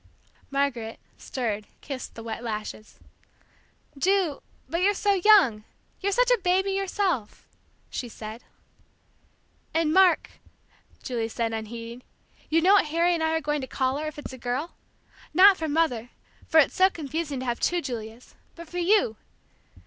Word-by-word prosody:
Margaret, 275 -5 -2 0.2
stirred, 215 -5 -3
kissed 270 -3 -7
the 225 - -8
wet 225 0 -5
lashes. 215 -1 -6 1.0
"Ju, 360 0 +1 0.3
but 335 +2 -2
you're 405 +2 +3
so 405 +1 +2
young 340 - +6 0.4
you're 400 +1 0
such - - +3
a - - +4
baby 375 +2 +1
yourself!" 385 - -2 0.4
she 245 - -4
said. 220 +1 -9 1.3
"And, 320 -1 +2
Mark," 370 -2 +4 0.7
Julie 230 -3 -2
said, 230 0 -2
unheeding, 230 +2 -6 0.5
"you 325 +1 +3
know 380 +3 +6
what 405 - +5
Harry 335 +3 +2
and 335 - -1
I 320 0 +1
are 320 - 0
going 295 -1 -1
to 260 - -5
call 260 +1 -1
her, 310 +1 -3
if 305 - -7
it's 295 - -7
a 260 - -9
girl? 255 +8 -3 0.6
Not 385 +3 +8
for 320 -3 -3
Mother, 290 -7 0 0.4
for 320 - +5
it's 300 - +4
so 375 +1 +5
confusing 305 -3 -4
to - - -5
have 240 -1 -2
two 350 - +1
Julias, 235 -5 -7 0.2
but 335 0 -10
for 355 +3 -5
you! 350 - +3
295 Hz, 155 wpm, -26 LUFS, 235-360 Hz, 1.3 s, Not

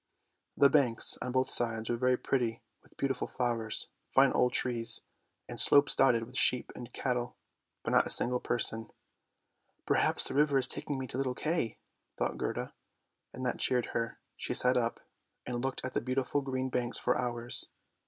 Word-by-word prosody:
The 140 - +6
banks 130 -6 +3
on 125 - -4
both 130 +1 -1
sides 115 -2 +4
were 120 - -1
very 125 +1 0
pretty 120 -2 -3 0.2
with - - -27
beautiful 135 -1 -3
flowers, 115 -3 0 0.2
fine 135 0 +3
old 125 - +1
trees, 115 -2 +1 0.5
and - - -5
slopes 145 0 +7
dotted 120 -4 +2
with 125 +3 -12
sheep 125 0 +3
and 120 -1 -11
cattle, 125 -2 -4 0.5
but - - -4
not - - +2
a - - -6
single 125 +1 +3
person. 115 -2 +3 0.5
" - - -48
Perhaps - - +1
the - - -4
river 145 0 +2
is 130 - +3
taking 145 - -4
me 130 - -5
to 125 - -7
little 130 -2 -2
Kay," 155 -7 -3 0.4
thought - - -3
Gerda, - - -5 0.6
and 130 - -7
that 125 - -3
cheered 125 -2 0
her; 115 0 -4 0.2
she - - -3
sat 125 0 +4
up 120 -2 -2 0.4
and 120 0 -5
looked 135 -1 -3
at 130 - -6
the - - -2
beautiful 130 +3 -2
green 130 -1 -4
banks 125 -1 +1
for 125 - -1
hours. 120 -1 0
125 Hz, 180 wpm, -30 LUFS, 120-130 Hz, 0.6 s, slopes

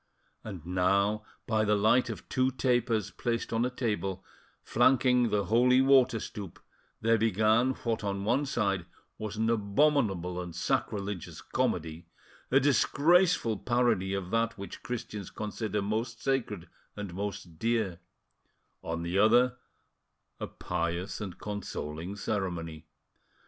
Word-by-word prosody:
And 95 -7 -8
now, 100 +4 +1 0.2
by 110 -1 +1
the 105 0 +3
light 110 +5 +3
of - - -7
two 130 0 +2
tapers 120 -5 0
placed 115 -1 -2
on 115 +1 +2
a 125 - +1
table, 105 -6 -3 0.4
flanking 125 0 +3
the 105 -1 +1
holy 125 +5 +4
water 130 -3 +5
stoup, 100 -5 -7 0.4
there 115 0 +3
began 110 +4 +3
what 115 -2 -1
on 100 -1 -2
one 125 +7 +1
side 100 -8 0 0.3
was 110 -1 -4
an 110 +1 +1
abominable 100 - +1
and 90 -2 -7
sacrilegious 100 +2 -2
comedy, 80 +1 -2 0.4
a 135 - +5
disgraceful 145 - +3
parody 115 -6 +1
of 95 -2 -4
that 115 0 0
which 100 0 -8
Christians 105 -5 -5
consider 105 -1 -3
most 110 +3 -2
sacred 115 -10 -1 0.3
and 105 -4 -6
most 90 -4 -5
dear; 110 -7 0 0.8
on 85 0 -4
the 85 +3 0
other, 120 +4 +4 0.8
a - - -4
pious 85 +5 -3
and 95 -4 -6
consoling 90 -4 -5
ceremony. 85 -7 -3
105 Hz, 130 wpm, -29 LUFS, 95-120 Hz, 0.8 s, water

